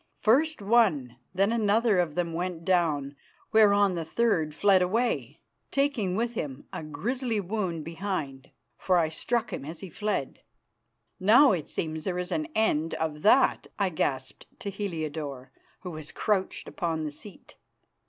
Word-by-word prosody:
First 285 +3 +2
one 230 -1 +5 0.2
and 120 - -22 0.2
then 195 +3 +3
another 220 -2 +3
of 165 -4 0
them 170 -2 -1
went 170 -1 -3
down, 155 -6 +1 0.4
whereon 205 -3 +5
the 170 -2 -2
third 160 -5 0
fled 195 0 +4
away, 230 +7 -1 0.3
taking 275 -10 0
with 235 +3 -1
him 145 - -5
a - - -4
grizzly 225 - -2
wound 185 -5 -3
behind, 160 -6 -4 0.3
for 185 -1 +2
I 165 -2 +2
struck 235 +8 -1
him - - -4
as 160 +3 -8
he 190 - -8
fled. 210 -10 -2 0.8
"Now 235 +9 +6
it 170 -6 -2
seems 160 -1 -3
there 180 -2 -1
is 180 0 -4
an 310 0 -1
end 165 -8 +1
of 155 -2 -3
that," 250 - +4
I 200 -2 +1
gasped 135 -5 -3
to 200 - -4
Heliodore, 155 -9 -5 0.3
who 180 - -6
was 155 -2 -8
crouched 200 -3 -1
upon 165 -3 -2
the 150 - -3
seat. 190 +7 -9
180 Hz, 155 wpm, -28 LUFS, 155-215 Hz, 0.8 s, Now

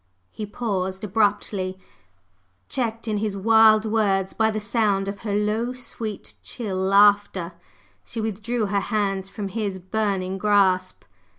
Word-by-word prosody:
He 215 - -6
paused, 190 -4 -3
abruptly 200 -2 0 0.9
checked 230 -2 -2
in 215 -1 0
his 205 -1 -2
wild 220 +1 +5
words 200 -3 +1
by 220 0 +2
the 215 0 -2
sound 210 -3 +1
of 200 0 -5
her 205 -3 -3
low, 215 +4 0
sweet, 225 -4 -5
chill 210 -6 -5
laughter. 200 -2 +3 0.5
She 230 - -7
withdrew 220 +2 -2
her 200 0 0
hands 195 -2 -1
from 200 -1 -5
his 200 -2 -3
burning 190 -1 -2
grasp. 190 -3 +2
205 Hz, 130 wpm, -24 LUFS, 195-220 Hz, 0.9 s, wild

